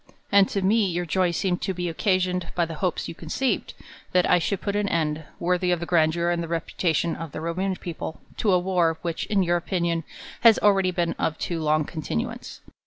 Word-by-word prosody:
And 200 -1 +6
to 195 - -1
me 210 +2 +3
your 175 0 -2
joy 180 +2 +1
seemed 175 +1 -1
to 190 - -2
be 175 0 -2
occasioned 180 +1 0
by 175 - +2
the 165 - -6
hopes 180 -3 -1
you - - -6
conceived, 170 +11 -2 0.4
that 180 -1 +4
I 180 - +5
should 195 +3 -1
put 200 0 -3
an 205 -1 0
end, 155 -1 -1
worthy 180 +1 +1
of 175 -1 +2
the 170 - -4
grandeur 170 0 +2
and 170 -1 -1
reputation 165 0 0
of 165 -3 -7
the - - -4
Roman 185 +4 -1
peo 175 -1 -6
ple, 160 - -7 0.2
to 210 - +2
a 180 - +5
jr^ar, 175 -3 +1
which, 170 -2 -3
in 200 -2 +2
your 175 0 +2
opinion, 170 -1 -1 0.4
has 230 -2 +7
already 195 -3 +3
been 175 -2 0
of 160 - 0
too 170 -2 -3
long 155 0 +2
continuance. 145 - -4
175 Hz, 210 wpm, -25 LUFS, 165-190 Hz, 0.4 s, has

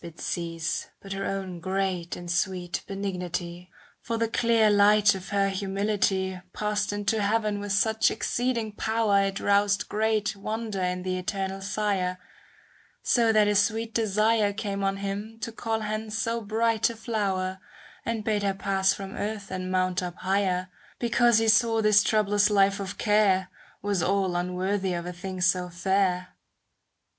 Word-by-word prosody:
67 170 -1 -6 0.3
CANZONIERE 155 - -1
But 195 0 -7
her 195 0 -3
own 190 -3 -4
great 185 -1 -2
and 175 -1 -6
sweet 180 0 -1
benignity; 180 -2 -4 0.3
For 230 -1 -3
the 230 0 +1
clear 230 -1 +3
light 205 +1 +5
of 190 -1 -7
her 200 -1 +2
humility 195 -1 -1
Passed 210 -1 -1
into 205 +1 0
heaven 210 0 0
with 205 0 -5
such 220 +2 +3
exceeding 235 -3 -1
power 215 -1 +1
It 195 0 -2
roused 200 0 +2
great 220 0 0
wonder 215 0 -4
in 180 0 -1
the 185 0 -2
Eternal 195 +1 -3
Sire, 195 -3 -1 0.9
So 230 -2 +3
that 215 -1 +4
a 210 - +3
sweet 220 +3 +1
desire 215 -1 +2
Came 200 -2 -3
on 195 0 0
Him 200 +3 -5
to 230 - -3
call 225 0 -2
hence 215 +1 -3
so 230 0 -1
bright 225 +1 +1
a 230 - -6
flower, 195 -5 -2 0.4
And 230 -2 -2
bade 215 -2 0
her 200 -1 0
pass 190 -1 +1
from 195 0 -7
earth 205 -2 -4
and 185 0 -4
mount 185 0 +1
up 180 -1 -5
higher, 185 -1 0 0.3
Because 240 -1 +3
He 225 0 +2
saw 225 0 +4
this 210 -1 +5
troublous 205 0 +2
life 200 -1 +3
of 195 -1 -5
care 200 -4 +2 0.3
Was 200 -3 0
all 190 0 +1
unworthy 185 +2 -1
of 170 0 -4
a 180 - -5
thing 185 +1 -6
so 180 0 +2
fair. 185 0 0
200 Hz, 160 wpm, -27 LUFS, 185-215 Hz, 0.9 s, light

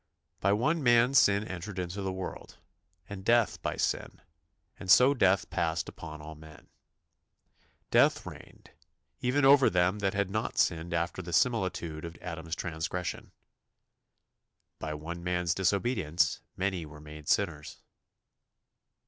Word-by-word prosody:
"By 100 - +2
one 150 +11 +1
man 120 0 +4
sin 100 -5 +5
entered 95 -1 -7
into 90 +2 -4
the 95 -1 -2
world, 95 0 -7 0.5
and 100 -1 -8
death 120 +1 +2
by - - -2
sin; - - -2 0.6
and 95 - -8
so 125 +8 +7
death 95 -7 +2
passed 85 0 -1
upon 75 -2 -9
all 80 +1 -8
men." 80 0 -15 1.2
"Death - - +4
reigned... - - -12 0.5
even 135 +3 +1
over 135 -1 +7
them 90 +3 +1
that 100 -1 -1
had 100 -1 0
not 110 +2 -2
sinned 85 0 +1
after 85 +2 -2
the 85 -1 -8
similitude 95 - 0
of 85 -2 -8
Adam's 80 -2 -5
transgression." 85 +1 -4 1.5
"By 80 -1 -4
one 85 +3 -7
man's 90 -1 0
disobedience 95 -3 0 0.2
many 95 -2 -1
were 75 -1 -11
made 75 0 -10
sinners." 80 -7 -1
90 Hz, 130 wpm, -29 LUFS, 80-105 Hz, 1.5 s, so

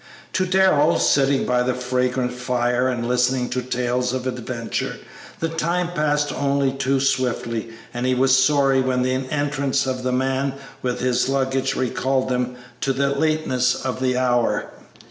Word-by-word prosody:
To 185 0 +1
Darrell, 180 -4 +4
sitting 140 -1 +2
by 125 0 +2
the 125 0 0
fragrant 125 0 -1
fire 125 0 0
and 120 -2 -2
listening 125 0 +1
to 125 - -1
tales 125 0 -1
of 130 -1 -3
adventure, 125 -2 -3 0.4
the 165 - 0
time 170 +2 -1
passed 150 -2 0
only 140 -1 +1
too 135 0 0
swiftly, 120 -4 -1 0.2
and 120 +1 -2
he 130 - +2
was 130 +1 +4
sorry 135 -2 +3
when 130 -1 0
the 130 0 +1 0.2
entrance 140 -2 0
of 130 -1 -2
the 125 0 -1
man 135 +1 0 0.3
with 125 -1 -2
his 125 0 +1
luggage 135 -1 0
recalled 130 +1 0
them 125 0 -1 0.2
to 135 - 0
the 140 +1 +1
lateness 140 -4 +1
of 130 -1 -4
the 125 -1 +1
hour. 120 -2 +1
130 Hz, 160 wpm, -22 LUFS, 125-140 Hz, 0.4 s, Darrell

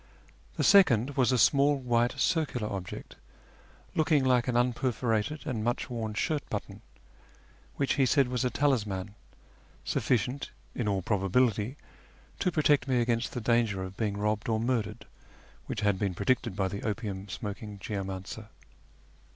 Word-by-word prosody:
The - - +1
second 140 - +5
was 130 -1 +3
a 130 - +3
small 140 +4 +4
white 120 -1 +1
circular 135 -9 0
object, 95 -3 -6 0.8
looking 155 -3 +3
like 125 -2 +3
an 125 - 0
unperforated 125 +1 0
and 120 -7 -2
much 120 +2 -1
worn 110 -3 -3
shirt 150 +7 0
button, 105 0 -5 0.9
which 140 - +1
he 130 - +4
said 140 0 +3
was 125 +1 -1
a 125 - +2
talisman, 105 -9 0 0.7
sufficient, 125 +4 0 0.2
in 120 - -2
all 100 -3 0
probability, 105 +4 +1 0.6
to 180 - +1
protect 145 -4 +3
me 130 -2 +2
against 115 0 0
the 125 - -3
danger 110 -4 +1
of 95 +1 -7
being 105 -2 -2
robbed 105 +1 -1
or 110 -1 +1
murdered 115 -2 -1 0.6
which 110 - -3
had 100 -2 +1
been 100 -4 -1
predicted 115 +1 0
by 95 -1 0
the 100 +1 -5
opium 100 -3 -4
smoking 105 +1 -6
geomancer. 95 +1 -5
115 Hz, 145 wpm, -29 LUFS, 105-130 Hz, 0.9 s, second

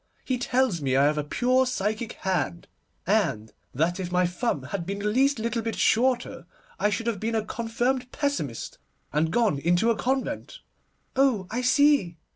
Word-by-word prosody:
He 255 -2 -1
tells 245 -8 +1
me 130 -2 0
I 135 +1 +5
have 150 +1 +2
a - - -1
pure 255 - +2
psychic 220 -1 -2
hand, 170 -3 -2 0.4
and 135 - 0 0.2
that 170 +7 0
if 180 -2 -4
my 180 0 +3
thumb 180 - -1
had 170 +7 -4
been 195 +4 -4
the 205 - -5
least 265 +6 +3
little 230 +1 -1
bit 225 0 -3
shorter, 250 +2 +1 0.3
I 210 - +3
should 220 +3 -2
have 230 -4 -1
been 225 +2 -2
a 220 -1 0
confirmed 245 +3 -2
pessimist, 220 - -3 0.3
and 155 +2 +2
gone 215 -7 +1
into 175 +9 +2
a - - +1
convent.' 260 +4 -2 0.6
'Oh, 260 -8 +2
I 245 +3 -1
see! 255 - +3
220 Hz, 175 wpm, -26 LUFS, 175-250 Hz, 0.6 s, I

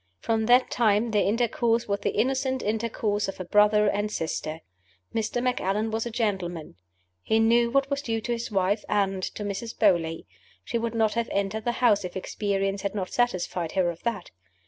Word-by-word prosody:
From 220 -1 0
that 250 +1 +5
time 220 -1 +2
their 210 -1 +3
intercourse 230 +1 +1
was 200 0 0
the - - -1
innocent 265 +2 0
intercourse 215 -1 -1
of 195 - -6
a 185 - -4
brother 210 +2 +4
and 205 +1 0
sister. 160 -2 -3 0.5
Mr. 225 +2 -1
Macallan 220 -3 0
was 225 +2 -1
a - - -3
gentleman: 190 -8 -2 0.5
he 220 - +1
knew 235 +1 +4
what 275 +2 +1
was 280 0 0
due 225 -5 -2
to 240 - -4
his 235 0 -2
wife 200 +1 +1
and 195 -2 +1
to 210 - -4
Mrs. 205 +3 -5
Beauly 170 -6 +2 0.4
she 235 - -2
would 230 0 -3
not 220 -2 +2
have 235 0 -1
entered 200 +2 -1
the 240 - +1
house 210 -5 +4
if 180 +1 -5
experience 195 0 -2
had 200 +1 -3
not 190 -3 -3
satisfied 185 -8 -1
her 185 -3 +2
of 170 - -12
that. 220 -6 -3
210 Hz, 190 wpm, -26 LUFS, 195-235 Hz, 0.5 s, that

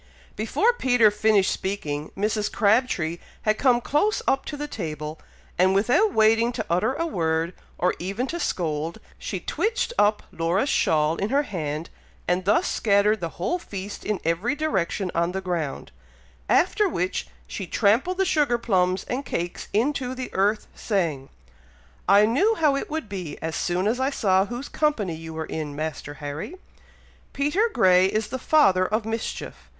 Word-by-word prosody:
Before 395 - +2
Peter 245 - +4
finished 210 -2 +3
speaking, 155 -7 -3
Mrs. 210 +1 0
Crabtree 200 -7 +1 0.2
had 215 0 +1
come 250 -3 +4
close 300 - +1
up 270 - +2
to 295 - -5
the 295 +1 -4
table, 155 - -5 0.4
and 190 +1 +4
without 250 - +3
waiting 225 -1 +4
to 220 -3 -3
utter 180 +10 +1
a 330 - -1
word, 165 - -1 0.2
or 180 - +2
even 195 +8 -2
to 340 +6 -4
scold, 160 - -2 0.2
she - - -4
twitched 465 +2 -1
up 210 +1 +3
Laura's 175 +10 0
shawl 155 +1 +2
in 200 - -1
her 280 +3 +2
hand, 155 - -4 0.4
and 180 +1 0
thus 210 +2 +3
scattered 210 0 +2
the 170 -2 -6
whole 350 - -1
feast 200 - -7
in 210 -3 -1
every 180 - 0
direction 195 - -1
on 170 +1 0
the 190 - -1
ground, 175 -6 -3 0.6
after 395 +3 +3
which 180 - -2 0.2
she 190 - -6
trampled 235 - +2
the 385 - +2
sugar 295 -9 +2
plums 185 -5 +1
and 260 +3 -3
cakes 175 -8 -4
into 255 +3 0
the 255 0 -6
earth, 205 +3 +1
saying, 165 - -2 0.8
"I 205 +1 +7
knew 375 - +2
how 300 -7 +3
it 275 - -3
would 315 -6 -3
be, 180 -7 -6
as 160 0 -4
soon 180 +2 -1
as 235 +4 0
I 265 +1 +1
saw 195 -7 +2
whose 245 +5 -5
company 235 - 0
you 160 0 -8
were 160 0 -3
in, 150 -2 -5
Master 150 -1 -5
Harry! 145 - -6 0.8
Peter 295 +12 +1
Grey 185 - +5
is 215 +2 -1
the 260 - -4
father 190 -12 +4
of 215 +1 -1
mischief! 225 0 -5
205 Hz, 165 wpm, -24 LUFS, 175-255 Hz, 0.8 s, I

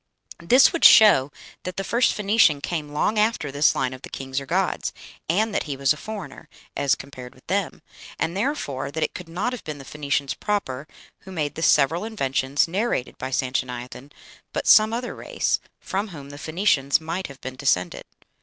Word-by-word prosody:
This 250 - +5
would 335 - -2
show 175 - +8 0.3
that 185 0 -6
the 195 - -1
first 235 +5 +2
Phoenician 205 -7 +3
came 150 0 -4
long 205 +9 0
after 210 -9 +1
this 145 +2 +3
line 130 0 -1
of 130 - -10
the - - -9
kings 135 0 -4
or 135 - -10
gods, - - -1 0.4
and 210 +6 +1
that - - -1
he 140 -3 -4
was 135 +1 +3
a - - -9
foreigner, 195 -5 -8 0.3
as 140 -1 +2
compared 130 -2 -11
with 130 - -22
them; 195 -2 -2 0.3
and, 170 - -2
therefore, 200 - -2
that 160 +2 -2
it - - -2
could 180 -2 -9
not 200 +9 -2
have 250 - -7
been 155 -2 -6
the 135 - -11
Phoenicians 140 -2 -2
proper 150 -7 -3 0.3
who 190 - -12
made 155 -5 -2
the 160 - -7
several 160 +3 +3
inventions 135 -10 0
narrated 190 - -2
by 130 - -4
Sanchoniathon, 125 +1 -3 0.4
but - - -2
some 215 0 +7
other 240 +2 -3
race, - - -1 0.2
from 200 +3 -3
whom 145 -7 -10
the 145 - -10
Phoenicians 155 -5 +1
might 165 +4 -4
have 140 -1 -13
been 130 -1 -7
descended. 90 -10 0
150 Hz, 190 wpm, -24 LUFS, 135-200 Hz, 0.4 s, show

